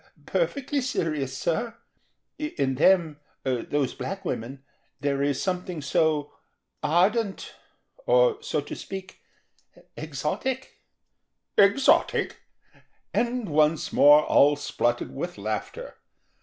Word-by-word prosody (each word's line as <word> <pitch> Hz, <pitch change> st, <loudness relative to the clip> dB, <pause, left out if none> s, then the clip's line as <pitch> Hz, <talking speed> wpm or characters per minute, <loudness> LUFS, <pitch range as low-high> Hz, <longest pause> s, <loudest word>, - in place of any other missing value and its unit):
"Perfectly 285 Hz, -, -1 dB
serious, 155 Hz, -, -2 dB
sir. 225 Hz, -, -2 dB, 0.6 s
In 140 Hz, -, -1 dB
them, 160 Hz, +1 st, +3 dB, 0.2 s
those 130 Hz, +2 st, -1 dB
black 195 Hz, 0 st, -6 dB
women, 130 Hz, +4 st, -4 dB, 0.4 s
there 140 Hz, 0 st, -1 dB
is 140 Hz, -1 st, 0 dB
something 180 Hz, -2 st, -3 dB
so 150 Hz, 0 st, 0 dB, 0.5 s
ardent, 195 Hz, +6 st, +1 dB, 0.5 s
or—so -, -, +2 dB
to -, -, -7 dB
speak—exotic." 245 Hz, +6 st, -7 dB, 0.8 s
"Exotic?" 200 Hz, +7 st, +3 dB, 0.8 s
And 240 Hz, -1 st, 0 dB
once 155 Hz, 0 st, +1 dB
more 150 Hz, +1 st, +7 dB
all 145 Hz, +1 st, +5 dB
spluttered 120 Hz, -4 st, -2 dB
with 175 Hz, +3 st, -5 dB
laughter. 105 Hz, +1 st, -5 dB
165 Hz, 90 wpm, -26 LUFS, 140-225 Hz, 0.8 s, more